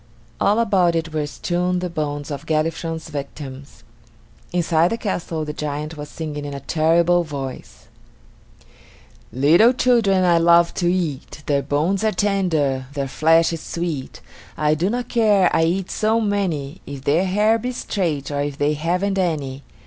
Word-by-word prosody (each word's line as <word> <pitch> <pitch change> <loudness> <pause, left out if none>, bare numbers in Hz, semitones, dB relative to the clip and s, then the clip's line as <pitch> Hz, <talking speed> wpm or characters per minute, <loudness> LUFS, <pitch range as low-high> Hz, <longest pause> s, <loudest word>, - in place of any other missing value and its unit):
All 205 +2 +3
about 190 -7 +2
it 165 -1 -2
were 150 -1 -1
strewn 180 +4 -1
the 180 0 -2
bones 145 -3 -4
of 145 +2 -6
Galifron's 160 +1 -1
victims. 140 -1 -8 0.7
Inside 170 -1 +2
the 230 - -2
castle 170 -7 -3
the 150 - -5
giant 150 +1 -4
was 150 -1 -8
singing 150 -2 -5
in 145 -1 -5
a - - -5
terrible 170 +4 +2
voice: 140 -4 -7 1.4
"Little 165 - +5
children 230 -7 +3
I 170 -1 +4
love 170 0 +5
to 175 0 +2
eat; 155 -4 -3
Their 140 -1 +1
bones 165 +9 0
are 220 - +2
tender, 170 -10 0
their 140 -1 -2
flesh 165 +4 +3
is 165 - -5
sweet. 165 -6 -4 0.4
I 150 0 +2
do 170 +5 0
not 240 +2 -2
care, 210 -6 +3
I 165 - +3
eat 180 +3 -1
so 220 +1 +1
many, 185 -9 -2
If 140 -2 -7
their 155 +6 +2
hair 210 +4 +2
be 250 +3 -3
straight, 165 - -2
or 145 0 -1
if 145 -1 -3
they 145 +1 +1
haven't 180 +6 -1
any." 145 -7 -2
165 Hz, 160 wpm, -21 LUFS, 145-185 Hz, 1.4 s, Little